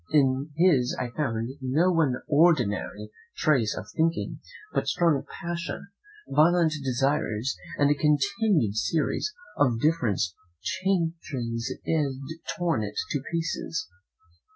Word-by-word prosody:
In 140 -1 +2
his 155 -8 +4
I 125 -1 -3
found 115 -4 -2
no 150 +8 +2
one 160 -7 +2
ordinary 125 -9 +2 0.3
trace 125 -9 +2
of - - -5
thinking; 165 +1 0 0.3
but - - 0
strong 165 -6 +2
passion, 170 +3 -5 0.4
violent 165 0 +4
desires, 135 -2 0 0.2
and 145 0 +4
a - - +6
continued 150 - +2
series 145 - 0 0.3
of 125 -6 +3
different 130 - +1 0.4
changes 160 -10 -1
had 145 0 -2
torn 170 -9 +1
it 105 0 -5 0.2
to 145 - 0
pieces. 165 +1 -2
145 Hz, 110 wpm, -27 LUFS, 125-165 Hz, 0.4 s, a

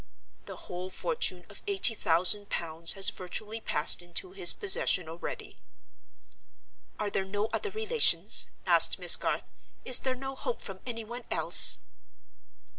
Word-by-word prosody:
The - - -10
whole 180 +1 -10
fortune 185 - -4
of - - -15
eighty 390 - +1
thousand 185 +2 +2
pounds 165 0 -3
has 195 -1 0
virtually 210 +5 -8
passed 150 -1 0
into 175 - -7
his 380 -2 +3
possession 380 - 0
already." 165 +2 -10 1.4
"Are 210 -1 -5
there 195 - -3
no 205 +3 -6
other 420 - -4
relations?" 440 +3 +2 0.2
asked - - +3
Miss - - +6
Garth. - - -6 0.3
"Is 255 -1 +3
there 260 -1 -5
no 270 +1 -9
hope 480 - -8
from - - -10
any 230 -2 -7
one 240 +2 -11
else?" - - +7
215 Hz, 140 wpm, -26 LUFS, 180-270 Hz, 1.4 s, else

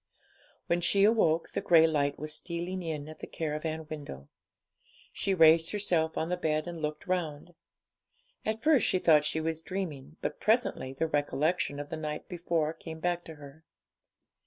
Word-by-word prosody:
When 175 0 +1
she 195 +3 +3
awoke, 200 -7 +3
the - - -2
grey 165 -2 +6
light 145 -3 +1
was 155 0 -4
stealing 175 +3 -4
in 155 -4 -4
at 155 - -10
the - - -7
caravan 160 0 -3
window. 140 - -8 0.8
She 195 -1 0
raised 160 -1 +6
herself 175 -6 0
on 160 - -1
the 180 - 0
bed 155 -3 0
and 170 -2 -6
looked 150 +2 -3
round. 175 -3 -3 0.9
At 220 +1 -2
first 300 -7 +4
she - - +2
thought 155 -4 +4
she 155 +1 0
was 160 0 -2
dreaming, 165 -6 -5
but - - -4
presently 220 - +1
the 135 - -1
recollection 145 0 0
of 145 0 -6
the 160 - -3
night 150 -1 -5
before 170 -3 -1
came 160 -1 -9
back 175 +1 -1
to 160 - -9
her. 145 +1 -13
160 Hz, 170 wpm, -30 LUFS, 150-175 Hz, 0.9 s, grey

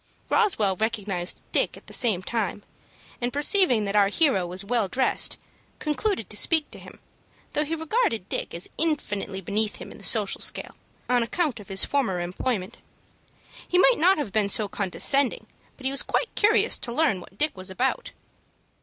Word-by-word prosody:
Roswell 225 - +3
recognized 205 -5 -1
Dick - - +1
at - - -16
the - - -10
same 210 -7 +2
time, 205 -2 -2 0.6
and 245 +1 -1
perceiving 290 - +3
that 200 0 -3
our 205 -1 +5
hero 200 - +2
was 185 +3 -4
well 225 -1 +1
dressed, 255 +7 +1 0.4
concluded 305 - -1
to - - -3
speak 310 +7 +2
to - - -9
him, - - -13 0.6
though 300 - +1
he 315 +2 -3
regarded 320 - -1
Dick - - -3
as 170 - -4
infinitely 205 -11 -1
beneath 210 +3 0
himself - - -9
in - - -12
the - - -14
social - - +1
scale, - - -2 0.3
on 250 -1 +3
account 270 +2 -1
of 205 - -12
his 195 0 0
former 240 -11 0
employment. 185 +4 -3 0.9
He 360 - +1
might 480 +6 +5
not 370 +4 +5
have 285 -10 -4
been 210 -2 +2
so 210 +1 +3
condescending, 235 +8 +1 0.3
but 265 - -12
he 265 - +1
was 275 - +2 0.3
curious 430 +1 +3
to 240 - -6
learn 270 - +1
what 190 - -15
Dick 305 +5 +1
was 185 0 -5
about. 265 - -1
230 Hz, 175 wpm, -25 LUFS, 200-300 Hz, 0.9 s, our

